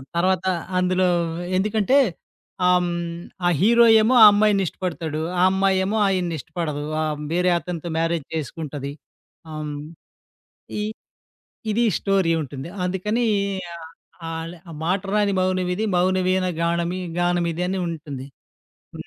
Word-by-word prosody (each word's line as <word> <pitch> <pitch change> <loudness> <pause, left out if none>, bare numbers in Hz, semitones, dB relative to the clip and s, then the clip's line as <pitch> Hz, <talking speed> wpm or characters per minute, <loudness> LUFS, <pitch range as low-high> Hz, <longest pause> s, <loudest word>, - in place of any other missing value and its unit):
తర్వాత 185 +1 +1 0.3
అందులో 185 0 +2 0.5
ఎందుకంటే 215 +6 +2 0.7
ఆహ్, 180 0 +5
హ్మ్. 175 - -1 0.5
ఆ - - +4
హీరో 235 +4 +6 0.2
ఏమో 225 +4 +3
ఆ - - +12
అమ్మాయినిష్టపడతాడు. 185 -6 0 0.2
ఆ - - +3
అమ్మాయేమో 190 +2 +1
ఆయన్నిష్టపడదు. 170 -4 -2 0.2
ఆహ్, 155 -1 -2
వేరే 180 +1 +2
అతనితో 170 -1 -5
మ్యారేజ్ 165 -2 0
చేసుకుంటది. 145 -2 -5 0.6
ఆహ్, 155 0 -5
హ్మ్. 150 -1 -5 1.1
ఈ - - -1 0.9
ఇది 235 +3 +2
స్టోరీ 195 -4 +1
ఉంటుంది. 135 +2 -7 0.2
అందుకనీ 210 +6 -1 0.5
ఆహ్, 165 -1 -10 0.4
అల 165 0 -5 0.2
ఆ - - -8
'మాటరాని 200 +4 +1
మౌనమిది 185 +2 0
మౌనవీణ 185 +1 +2 0.2
గానమి 170 +2 0 0.2
గానమిదని' 175 +1 0
ఉంటుంది. 145 -5 -6 0.7
హ్మ్. - - -8
180 Hz, 110 wpm, -23 LUFS, 165-190 Hz, 1.1 s, ఆ